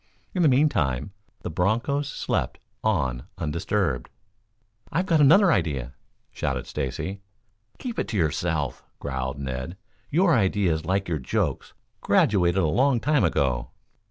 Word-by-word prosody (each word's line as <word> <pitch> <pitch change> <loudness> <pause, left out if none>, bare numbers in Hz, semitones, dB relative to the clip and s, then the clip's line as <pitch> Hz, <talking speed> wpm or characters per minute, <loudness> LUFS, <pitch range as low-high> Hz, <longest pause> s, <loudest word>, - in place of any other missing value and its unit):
In 185 - 0
the 165 - +5
meantime, 100 - +2 0.3
the 90 - -4
bronchos 120 - 0
slept - - -2 0.3
on 65 - 0
undisturbed. 85 -2 -1 0.8
"I've 175 +6 0
got 165 -4 +3
another 175 +6 +6
idea," 70 - -1 0.4
shouted 65 -2 -2
Stacy. 95 +9 -4 0.6
"Keep 245 -3 -5
it - - -1
to 110 - -2
yourself," 80 -4 -1
growled 65 +1 -3
Ned. 65 +5 -5 0.3
"Your 175 +3 +3
ideas, 95 -7 +1
like 95 +2 0
your 80 -3 -1
jokes, 65 - -2 0.3
graduated 95 -2 +3
a - - +3
long 125 - +3
time 145 +4 +2
ago." 65 -3 +1
90 Hz, 130 wpm, -25 LUFS, -, 0.8 s, another